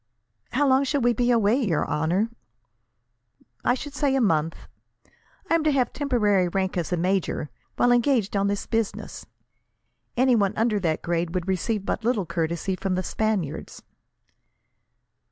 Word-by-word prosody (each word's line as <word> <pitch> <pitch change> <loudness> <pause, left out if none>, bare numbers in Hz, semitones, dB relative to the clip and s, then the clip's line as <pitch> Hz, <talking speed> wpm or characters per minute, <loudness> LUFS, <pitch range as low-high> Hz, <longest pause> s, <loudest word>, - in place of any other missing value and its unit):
"How 290 - +2
long 265 +1 +4
shall 280 0 0
we 240 0 +3
be 240 +2 +1
away, 230 -1 +3
your 185 -10 0
honour?" 175 +9 0 1.3
"I 245 - +3
should 285 +2 -7
say, 275 -1 +1
a - - +2
month. 165 -8 +1 0.9
I - - 0
am 330 -1 +3
to 310 - +3
have 260 -3 +1
temporary 210 -10 +2
rank 190 +1 -1
as 175 -2 -2
major, 180 -3 -1 0.2
while 245 - +3
engaged 240 -4 +2
on 200 0 +2
this 200 0 -2
business. 225 -2 -3 0.9
Anyone 240 -6 +3
under 220 -1 +2
that 165 -4 -1
grade 170 +1 -1
would 180 0 -2
receive 195 +2 -1
but 220 - -2
little 225 -5 +1
courtesy 170 +3 -2
from 185 0 -2
the 185 - -1
Spaniards." 190 -10 -2
205 Hz, 150 wpm, -25 LUFS, 180-245 Hz, 1.3 s, long